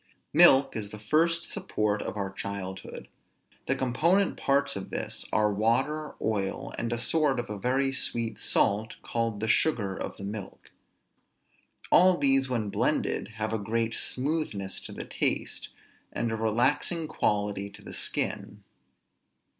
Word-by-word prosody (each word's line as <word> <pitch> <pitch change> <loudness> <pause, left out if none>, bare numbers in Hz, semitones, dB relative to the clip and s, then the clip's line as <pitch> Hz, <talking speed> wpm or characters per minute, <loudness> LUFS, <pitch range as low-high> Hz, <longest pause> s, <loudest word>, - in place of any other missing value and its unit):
Milk 145 -5 +7
is 105 -2 -4
the 105 - -9
first 165 +10 +2
support 105 - -1
of - - -5
our 100 -1 -2
childhood. 95 -1 -6 0.6
The - - +2
component 170 +10 +2
parts 140 +1 +1
of 95 -1 -6
this - - -3
are 105 -1 +2
water, 135 +9 0
oil, 110 +6 -2
and 115 0 -2
a 120 - 0
sort 135 +2 +3
of 120 -3 -4
a 105 - -5
very 135 +5 +1
sweet 115 -4 -1
salt, 110 +2 +1
called 115 -3 -2
the 110 - 0
sugar 110 -5 +2
of - - -6
milk. 100 0 -7 1.2
All 185 0 +6
these 135 -2 +2
when 110 -5 -1
blended - - 0
have 110 0 -2
a 110 - 0
great 115 +2 -1
smoothness 125 -11 -1
to - - -6
the - - -6
taste, - - -2 0.4
and 115 - -2
a - - -1
relaxing 125 - +1
quality 100 -7 -1
to 100 - -15
the - - -9
skin. - - -3
115 Hz, 145 wpm, -28 LUFS, 105-140 Hz, 1.2 s, Milk